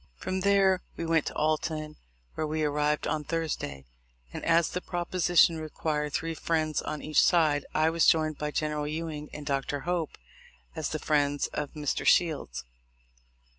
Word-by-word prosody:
From 185 - -3
there 195 -1 +3 0.2
we 165 - -3
went 165 -1 +2
to - - -5
Alton, 155 0 -1 0.4
where 155 - -2
we 155 +1 -1
arrived 150 0 +1
on 155 - -1
Thursday; 155 - -3 0.5
and, - - -6
as 165 0 +3
the 180 - -3
proposition 175 -2 +2
required 150 -1 -2
three 165 0 -1
friends 155 -1 0
on 150 - -5
each 155 -1 +3
side, 155 -5 +3
I 155 +1 +3
was 165 0 +3
joined 155 -2 +3
by 150 - -2
General 150 -1 -2
Ewing 155 -1 -4
and 150 -1 -8
Dr. 140 0 -1
Hope, 175 0 -2 0.6
as - - -2
the - - -2
friends 145 -1 +1
of 150 -1 -3
Mr. 150 -2 -2
Shields. 145 - +2
155 Hz, 160 wpm, -28 LUFS, 150-165 Hz, 0.6 s, there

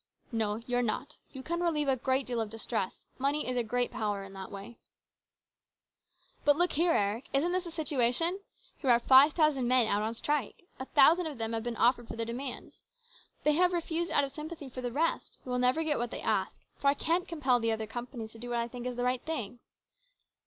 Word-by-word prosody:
" - - -37
No, 210 -1 0
you're 245 0 +1
not. 245 +4 -2
You 265 -1 -8
can 340 +3 -2
relieve 310 -4 0
a 270 - +3
great 260 +1 0
deal 240 -2 -2
of 220 - -3
distress. 225 -3 -4
Money 280 +2 0
is 255 - -1
a 245 - +2
great 245 +2 0
power 205 -2 -2
in 195 0 -11
that 190 -1 -8
way." 200 +4 -9 1.2
" - - -33
But 290 - +5
look 350 0 +2
here, 335 +2 +2
Eric. 210 +3 0
Isn't 300 +6 +2
this 365 0 -1
the - - -5
situation? 315 +2 +1 0.4
Here 265 - -2
are 235 -1 +6
five 265 +5 +7
thousand 305 -6 +2
men 250 -1 +4
out 205 -1 +1
on 220 +2 -2
strike. 290 - -2 0.2
A 260 - -4
thousand 320 +5 +5
of 295 -4 -6
them 225 0 -2
have 225 - -1
been 240 0 -3
offered 240 0 +3
their 230 0 -4
demands. 245 +3 -6 0.6
They 300 - +4
have 360 +3 +3
refused 340 0 -1
out 285 - +3
of 275 - -3
sympathy 305 -1 -7
for 255 0 -7
the 245 -1 -3
rest, 320 +6 -1
who 255 - -7
will 250 - +1
never 255 +6 +3
get 300 -2 0
what 240 0 -1
they - - -6
ask, - - -1 0.2
for 280 - 0
I 280 - +5
can't 345 +5 0
compel 270 -7 +2
the 230 -1 0
other 220 0 -2
companies 235 0 -6
to 225 - -13
do 245 +1 -7
what 240 - -1
I 235 0 0
think 245 +1 -6
is 250 - -4
the 245 - -2
right 250 0 0
thing. 245 -8 -4
255 Hz, 230 wpm, -30 LUFS, 235-300 Hz, 1.2 s, five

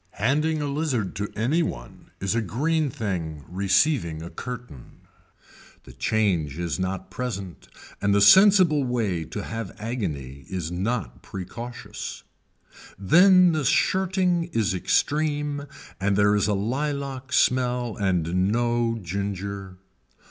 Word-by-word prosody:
Handing 150 +6 +1
a - - -2
lizard 140 - -1
to 105 +1 -3
any 130 +11 +1
one - - -6
is 100 +1 -1
a 115 - +1
green 150 - 0
thing 85 - -4
receiving 95 - +1
a 85 - -8
curtain. 125 - -9 0.8
The 65 - -13
change 85 - 0
is 85 0 -2
not 95 0 -3
present 100 - -5 0.3
and 100 - +2
the 100 - +4
sensible 180 - +6
way 110 -10 -1
to 100 +5 -6
have 115 -3 -6
agony 75 - -5
is 90 -3 -4
not 100 +3 -3
precautious. 115 +3 -7 0.7
Then 180 - +6
the 155 -2 -1
shirting 185 - +2
is 115 - 0
extreme 145 - 0 0.3
and 100 +1 +1
there 105 0 +4
is 100 0 +2
a 105 - +1
lilac 135 +4 -3
smell 125 -3 +1
and 90 -1 0
no 120 0 +1
ginger. 100 +1 -4
110 Hz, 125 wpm, -25 LUFS, 95-140 Hz, 0.8 s, sensible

